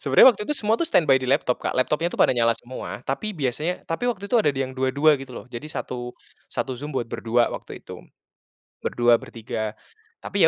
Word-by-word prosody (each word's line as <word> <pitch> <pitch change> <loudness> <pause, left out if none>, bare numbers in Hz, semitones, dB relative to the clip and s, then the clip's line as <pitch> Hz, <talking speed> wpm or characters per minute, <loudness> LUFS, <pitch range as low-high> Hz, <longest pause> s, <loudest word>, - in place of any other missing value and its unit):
sebenarnya - - +7
waktu - - -5
itu - - -1
semua 225 -5 +2
tuh 335 - 0
standby 155 - +4
di 130 - -2
laptop 130 -1 +2
Kak, - - 0
laptopnya 150 +6 +1
tuh - - -4
pada 125 - +4
nyala 115 0 +4
semua. 125 +1 -7
Tapi 210 +11 -2
biasanya 155 - -2
tapi 165 +8 -2
waktu 200 -5 -2
itu 245 - +3
ada 180 -11 +3
yang 135 -1 -3
2- 130 0 +1
2 150 +2 +5
gitu 135 -1 -9
loh, - - -8
jadi 125 +3 -7
satu 125 -5 -5 0.3
satu 130 -2 -3
Zoom 145 +3 -6
buat 120 -3 -2
berdua 120 +1 +1
waktu - - -7
itu. - - -9 0.8
Berdua, 120 -1 +3
bertiga, 110 -1 -5 0.5
tapi - - +3
135 Hz, 205 wpm, -24 LUFS, 120-165 Hz, 0.8 s, sebenarnya